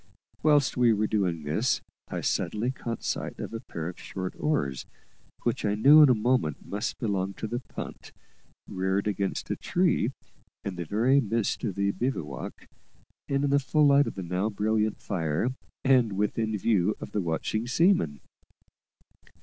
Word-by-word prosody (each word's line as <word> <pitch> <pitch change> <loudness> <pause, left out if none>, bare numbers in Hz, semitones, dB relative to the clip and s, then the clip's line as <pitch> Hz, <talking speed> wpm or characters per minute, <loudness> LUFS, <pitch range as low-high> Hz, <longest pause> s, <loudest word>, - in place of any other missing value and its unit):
Whilst 145 -5 +3
we 120 -2 +5
were 105 0 +1
doing 90 -7 0
this, 80 - +1 0.3
I - - -4
suddenly 115 +4 0
caught 115 -3 -5
sight - - -3
of - - -6
a 115 - -3
pair 80 -6 -6
of 90 - -7
short 95 -1 -5
oars, 70 - -1 0.6
which - - -1
I 105 -1 +1
knew 145 +8 +8
in 150 - +8
a 125 - +5
moment 110 - 0
must 105 +4 -3
belong 100 -4 -1
to - - -5
the 120 +3 -2
punt, 125 - -9 0.6
reared 95 +1 -1
against 100 -2 -2
a - - 0
tree - - +1 0.5
in 100 -2 -4
the 85 -1 -4
very 120 - +3
midst 115 -2 -1
of 100 - -2
the 100 0 +1
bivouac, 85 - -4 0.6
and 140 0 +1
in 145 - +2
the 140 - +5
full 150 +2 +2
light 140 0 +5
of - - -5
the 95 - -5
now 90 +4 -1
brilliant 110 +1 0
fire, 85 +2 -1 0.3
and 125 -5 +4
within 105 +2 0
view 105 -1 +2
of - - -8
the 105 - 0
watching 95 +7 -2
seaman. 130 - +2
105 Hz, 165 wpm, -27 LUFS, 95-125 Hz, 0.6 s, knew